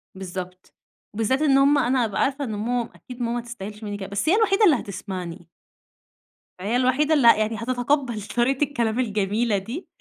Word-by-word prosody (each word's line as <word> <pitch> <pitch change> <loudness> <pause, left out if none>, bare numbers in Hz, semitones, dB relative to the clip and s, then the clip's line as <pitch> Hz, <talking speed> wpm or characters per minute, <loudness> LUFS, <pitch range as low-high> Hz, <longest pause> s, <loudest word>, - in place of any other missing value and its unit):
بالضبط، 185 -1 -8 0.4
وبالذات 225 +6 0
إن 275 -3 +4
هُم 280 +2 +5
أنا 255 -2 +2
هأبقى 210 -4 -1
عارفة 280 +1 0
إن 220 -4 -4
ماما 235 +3 -2
أكيد 250 -1 -11
ماما 235 0 -1
ما 240 - -2
تستاهلش 215 -2 -9
منّي 205 -1 -4
كده. 195 -2 -6
بس 205 +9 -1
هي 365 - +5
الوحيدة 430 -1 +3
اللي 330 -7 +6
هتسمعني. 185 -4 -7 1.1
ما 185 - -7
هي 220 +4 0
الوحيدة 260 +5 +2
اللي 280 -6 +4
ه - - +10
يعني 215 +1 -1
هتتقبَّل 245 0 -1
طريقة 245 +7 0
الكلام 240 -5 -1
الجميلة 210 -1 0
دي. 235 - -6
235 Hz, 185 wpm, -24 LUFS, 205-270 Hz, 1.1 s, ه